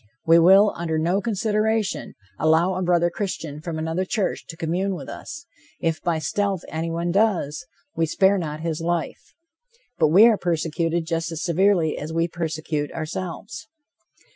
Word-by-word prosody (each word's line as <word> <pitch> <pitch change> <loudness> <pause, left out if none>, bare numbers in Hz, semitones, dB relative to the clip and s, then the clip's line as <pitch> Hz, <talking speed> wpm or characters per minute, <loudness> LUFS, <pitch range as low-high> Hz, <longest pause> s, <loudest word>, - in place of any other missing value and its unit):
We 165 +1 +6
will, 195 +5 +6
under 160 -2 -2
no 175 +5 +1
consideration, 215 -1 -1 0.2
allow 160 +4 +3
a 185 - -3
brother 175 -1 +2
Christian 165 -7 -4
from 165 -1 -5
another 160 +3 -1
church 200 +1 -2
to 165 - -9
commune 180 +4 -1
with 140 -6 -8
us; 320 +3 -8 0.3
if 165 -1 -1
by 170 -2 0
stealth 195 +4 -1
anyone 165 +2 -2
does, 175 -6 0 0.3
we 165 0 +1
spare 195 +4 +3
not 155 -2 -5
his 165 -1 -3
life. 170 -3 -3 0.6
But 160 - +5
we 185 +9 +7
are 230 -3 +5
persecuted 165 0 -1
just 165 0 -2
as 165 0 -4
severely 175 -2 +2
as 150 +2 -6
we 165 +1 +1
persecute, 155 -3 -3
ourselves. 165 -3 -6
170 Hz, 155 wpm, -23 LUFS, 160-190 Hz, 0.6 s, we